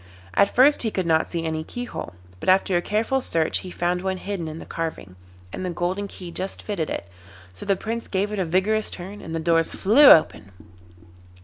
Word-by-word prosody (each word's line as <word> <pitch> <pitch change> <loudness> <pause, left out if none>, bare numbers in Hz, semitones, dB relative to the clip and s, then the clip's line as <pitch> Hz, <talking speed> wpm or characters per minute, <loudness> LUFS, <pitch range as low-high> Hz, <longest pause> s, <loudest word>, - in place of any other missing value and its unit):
At 200 - +4
first 280 +4 +4
he 225 - 0
could 190 -4 -2
not 160 -1 +2
see 170 -2 -4
any 160 -1 -2
keyhole, 245 - -7 0.2
but - - -2
after 190 0 +3
a 175 - +2
careful 225 +7 0
search 165 -8 +1
he 185 - -8
found 175 0 -1
one 190 0 -2
hidden 190 -3 -4
in 155 0 -6
the - - -9
carving, 160 - -5 0.4
and - - -5
the 185 - -2
golden 180 +4 -2
key 180 -3 -9
just 190 +3 -5
fitted 185 -7 -3
it; - - -4 0.5
so 145 - -10
the 200 - +3
Prince 230 +4 -4
gave 200 +2 -1
it 210 - -3
a 185 - 0
vigorous 195 +6 +1
turn 195 +3 -8
and 165 - -6
the - - -1
doors 165 0 +2
flew 235 +10 +5
open. 130 -10 +5
185 Hz, 210 wpm, -23 LUFS, 165-205 Hz, 0.5 s, flew